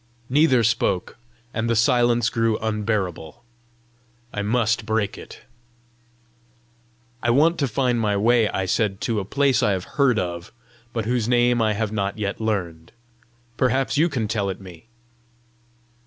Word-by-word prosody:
Neither 135 -4 +4
spoke, 110 -2 0 0.3
and 115 +1 -2
the 115 - +2
silence 120 -1 +3
grew 115 -1 0
unbearable. 105 -3 -3 0.9
I 105 - -2
MUST 115 +1 +1
break 110 -1 -1
it! - - -12 1.8
"I 120 - 0
want 155 +7 +3
to 140 - +1
find 125 0 0
my 105 -2 +1
way," 115 +1 +3
I 95 - -2
said, 95 0 0
"to 115 -3 -1
a 95 - -4
place 135 +2 +2
I 105 -5 +2
have 95 -2 -3 0.2
heard 125 -5 +4
of, 85 -2 -4 0.4
but 115 -2 -3
whose 120 -1 0
name 120 -1 +3
I 110 -1 +2
have 105 0 -2
not 100 -1 -2
yet 100 0 -3
learned. 90 -7 -3 0.6
Perhaps 130 -2 +1
you 165 +4 +3
can 120 -8 -2
tell 105 -3 -1
it 95 - -5
me!" 90 0 -13
115 Hz, 150 wpm, -23 LUFS, 100-120 Hz, 1.8 s, Neither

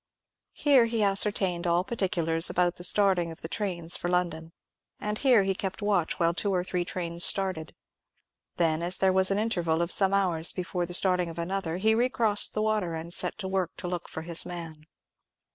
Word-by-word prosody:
Here 275 -5 +4
he 230 -2 -1
ascertained 195 -3 +1
all 170 +1 +2
particulars 170 -6 0
about 175 0 0
the 175 - -7
starting 185 -3 +3
of 165 - -10
the - - -4
trains 175 -3 -2
for 175 - -4
London, 170 -2 -2 0.5
and 210 0 -3
here 250 -7 +4
he 195 0 0
kept 190 0 -5
watch 200 -6 -1
while 170 0 +2
two 200 +3 -1
or 180 -2 0
three 180 -1 -2
trains 170 -1 -2
started. 185 -5 +1 0.8
Then, 165 -2 +1
as 175 +2 +1
there 190 -1 +2
was 190 0 +4
an 195 - 0
interval 175 -7 -1
of 170 +1 0
some 195 -1 +4
hours 180 -5 +1
before 180 -1 -4
the 175 - -1
starting 180 -2 +2
of 165 - -10
another, 170 -1 -3
he 220 +4 +2
re 240 +3 +1
crossed 220 -5 0
the 215 - 0
water, 210 -6 -1
and 165 +2 0
set - - +3
to 200 -3 -5
work 190 -3 -3
to - - -6
look 175 -1 -5
for 160 - -7
his 170 0 0
man. 165 -3 -8
180 Hz, 200 wpm, -27 LUFS, 170-200 Hz, 0.8 s, Here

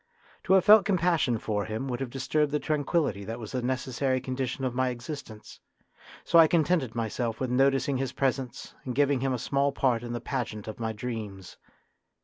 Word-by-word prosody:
To - - +3
have 190 -2 +5
felt 210 0 +8
compassion 170 - +2
for 105 -1 -2
him 110 +5 -4
would 125 -2 -3
have 135 -2 -3
disturbed 140 +3 0
the 150 - +1
tranquillity 145 - 0
that 115 +3 -5
was 110 -3 -8
a 130 - -1
necessary 130 +1 -1
condition 130 +1 -3
of 125 - -1
my 130 +1 +1
existence, 120 -3 -8 0.6
so 170 - +5
I 160 - +8
contented 155 -7 +1
myself 115 0 -2
with 130 -2 -2
noticing 135 +1 +2
his 130 -1 -2
presence 130 -2 -2
and 125 -2 -4
giving 140 -1 +3
him 135 +1 0
a 125 - 0
small 140 +3 0
part 125 -4 +1
in 120 0 -5
the 120 - -2
pageant 115 -5 -4
of 110 - -7
my 110 -1 -2
dreams. 105 -4 -6
130 Hz, 190 wpm, -28 LUFS, 120-140 Hz, 0.6 s, felt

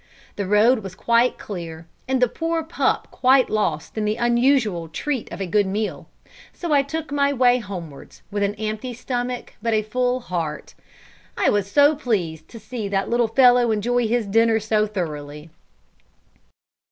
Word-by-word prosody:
The 200 -2 -3
road 220 +5 +4
was 195 -3 -8
quite 235 +5 +2
clear, 170 -5 -7 0.2
and 260 0 +1
the 250 - +4
poor 330 +5 -2
pup 320 - -1
quite 260 0 +3
lost 170 -8 -1
in - - -1
the 210 0 0
unusual 240 -7 +2
treat 255 - -4
of - - -7
a 195 - -2
good 200 +2 +1
meal; 210 +3 -3 0.4
so 340 -4 -3
I 285 - +5
took 305 +2 -5
my 280 0 +2
way 250 -2 +3
homewards, 175 - -9
with 205 0 -2
an 200 +1 0
empty 220 +3 -4
stomach 245 0 -4
but 230 0 +1
a 215 - +1
full 250 +3 0
heart. 165 -8 -4 0.6
I - - +3
was 200 -1 0
so 285 +7 +5
pleased 175 - -2
to 230 - -11
see 230 -3 -5
that 195 +1 -1
little 240 -1 +2
fellow 245 0 +5
enjoy 235 +2 +1
his 235 0 0
dinner 225 +2 +3
so 215 0 +1
thoroughly. 150 -5 -6
220 Hz, 165 wpm, -22 LUFS, 200-250 Hz, 0.6 s, I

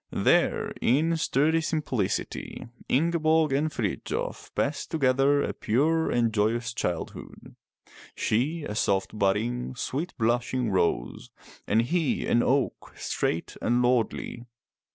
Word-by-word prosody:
There - - +2
in 155 +7 +3
sturdy 160 +1 +2
simplicity 140 - -2 0.2
Ingeborg 160 0 +2
and 150 +3 +1
Frithjof 110 -8 -3
passed 145 +1 -1
together 140 -1 +3
a - - -2
pure 160 +8 +1
and 115 -2 +1
joyous 115 +2 0
childhood, 90 -8 -5 0.3
— - - -36 0.3
she 145 +9 0
a 105 - -4
soft 100 -2 0
budding, 115 +6 0
sweet 145 +7 -3
blushing 120 0 0
rose, 85 -9 -1 0.4
and 110 +3 +3
he 160 +3 0
an 120 - +3
oak, 135 +1 0
straight 85 - -2
and 120 +1 +2
lordly. 120 0 0
125 Hz, 115 wpm, -27 LUFS, 115-155 Hz, 0.4 s, in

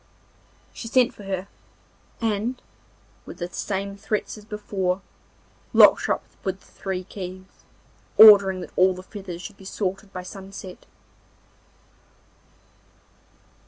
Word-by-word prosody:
She 230 - -7
sent 250 +1 +3
for 205 - -12
her, 190 0 -3 0.7
and 225 +3 -1 0.7
with - - -9
the 175 - -4
same 200 +2 -3
threats 210 +1 -3
as 210 -1 -13
before 195 -3 -2 0.7
locked - - +7
her - - +3
up - - -12 0.2
with 190 0 -2
the - - -22
three 190 -2 -4
keys, 185 0 -9 0.5
ordering 200 -4 +9
that - - -9
all 185 0 +4
the 185 - -9
feathers 185 -3 -8
should 210 - -9
be 195 - -14
sorted 195 +1 -3
by 185 -1 -6
sunset. 190 -1 -10
195 Hz, 125 wpm, -24 LUFS, 185-210 Hz, 0.7 s, ordering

